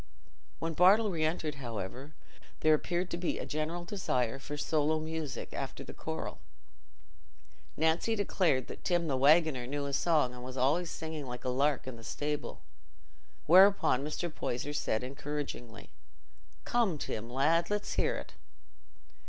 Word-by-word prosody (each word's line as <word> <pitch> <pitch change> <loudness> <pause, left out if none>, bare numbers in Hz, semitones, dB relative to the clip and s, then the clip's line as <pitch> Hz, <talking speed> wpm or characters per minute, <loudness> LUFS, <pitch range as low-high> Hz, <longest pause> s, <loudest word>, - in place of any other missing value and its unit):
When 165 0 -3
Bartle 200 +6 +5
re 160 -3 -1
entered, 155 -3 -1
however, 120 +5 -6 0.5
there 155 - +5
appeared 175 +4 0
to - - -1
be 175 0 -1
a - - -4
general 160 +3 -3
desire 135 - -1
for 145 +2 -6
solo 155 +1 +1
music 160 -2 -5
after - - -5
the - - -9
choral. - - -5 1.4
Nancy 160 +8 +2
declared 175 - +1
that - - -10
Tim 175 -2 +1
the 140 - +1
waggoner 140 -2 +4
knew 145 +2 -2
a 140 - -4
song 150 -4 +2
and 125 0 -9
was 130 +1 -7
"allays 155 +7 +2
singing 160 -3 -5
like 125 0 -7
a - - +1
lark 135 +1 +1
i' - - -3
the 115 -2 -11
stable," 145 0 -4 0.8
whereupon 185 -6 +6
Mr. 155 +2 -3
Poyser 140 +1 -3
said 125 -5 -1
encouragingly, 135 -4 -6 0.7
"Come, 225 -9 +1
Tim, 115 -4 -4
lad, 155 +7 +2
let's 210 0 -1
hear - - +1
it." - - -8
150 Hz, 150 wpm, -31 LUFS, 130-170 Hz, 1.4 s, whereupon